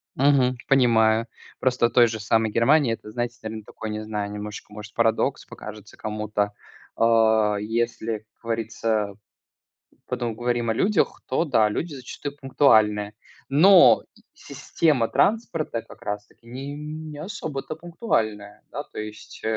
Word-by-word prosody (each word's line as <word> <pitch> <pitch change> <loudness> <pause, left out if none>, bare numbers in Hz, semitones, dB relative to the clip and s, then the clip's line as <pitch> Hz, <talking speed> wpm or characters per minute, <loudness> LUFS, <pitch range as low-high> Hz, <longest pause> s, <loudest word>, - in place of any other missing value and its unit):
Мгм, 130 -2 +3
понимаю. 115 -4 +4 0.3
Просто 125 -2 +2
в - - -9
той 120 -2 +6
же 110 -1 -4
самой 110 +1 +1
Германии 125 +2 +4
это, 105 -1 -8
знаете, 120 +1 -3
такой, 110 0 -7
наверное, 105 0 -4
не - - -9
знаю, 105 -1 -3
немножечко, 105 0 -7
может, 105 0 -9
парадокс 115 -1 +1
покажется - - -11
кому-то. 105 -1 -2 0.4
А, 110 -2 +4
если, 115 +1 -2
как 110 - -30 0.2
говорится, 110 -2 -1 0.9
потом 120 -3 -2
говорим 120 0 -1
о 110 - +1
людях, 195 - +1
то 130 +6 +1
да, 115 -9 +3
люди 150 +9 -3
зачастую 140 +2 -7
пунктуальны. 110 -7 +3 0.4
Но 180 +6 +7 0.3
система 145 - 0
транспорта 165 - 0
как - - -16
раз 105 0 -4
таки 115 - -26
не 135 +4 -6
не 150 0 -7
особо-то 155 -4 -5
пунктуальна. 110 - -2
Да, - - -4
то - - -12
есть 110 0 -8
115 Hz, 140 wpm, -24 LUFS, 110-140 Hz, 0.9 s, Но